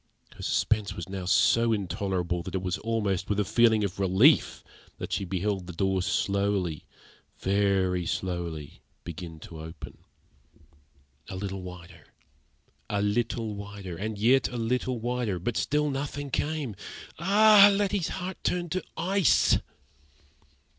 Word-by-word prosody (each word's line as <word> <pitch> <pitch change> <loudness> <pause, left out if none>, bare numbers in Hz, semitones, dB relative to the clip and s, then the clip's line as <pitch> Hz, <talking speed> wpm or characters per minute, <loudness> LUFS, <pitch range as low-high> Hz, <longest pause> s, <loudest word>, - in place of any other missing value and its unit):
Her - - -12
suspense 105 -2 0
was 85 - -6
now 95 -1 -5
so 115 +4 +4
intolerable, 95 -3 -1
that 85 - -6
it 95 - -2
was 90 -1 -2
almost 105 -5 -1
with 105 0 0
a 105 - +1
feeling 110 +1 +4
of 100 -1 -3
relief 100 - +4 0.3
that - - -5
she 100 - -1
beheld 95 0 -2
the 90 - -7
door 95 +2 0
slowly 100 -4 0 0.5
very 95 -3 +1
slowly 85 -5 -4 0.2
begin 85 0 -7
to 80 - -10
open. 80 -1 -10 1.3
A 95 - -6
little 95 0 -4
wider 90 -3 -11 0.8
a 100 -1 0
little 110 +1 -1
wider 100 -3 -7
and 105 +4 -4
yet 125 +6 +4
a 125 - -6
little 125 +2 -1
wider; 120 -4 -1
but 110 +7 -3
still 150 0 +1
nothing 140 0 -4
came. 145 -6 -2 0.4
Ah! 205 +3 +7
Letty's 200 -3 0
heart 185 0 -5
turned 175 -2 -1
to 185 +1 -1
ice. 185 0 +3
100 Hz, 135 wpm, -27 LUFS, 90-125 Hz, 1.3 s, Ah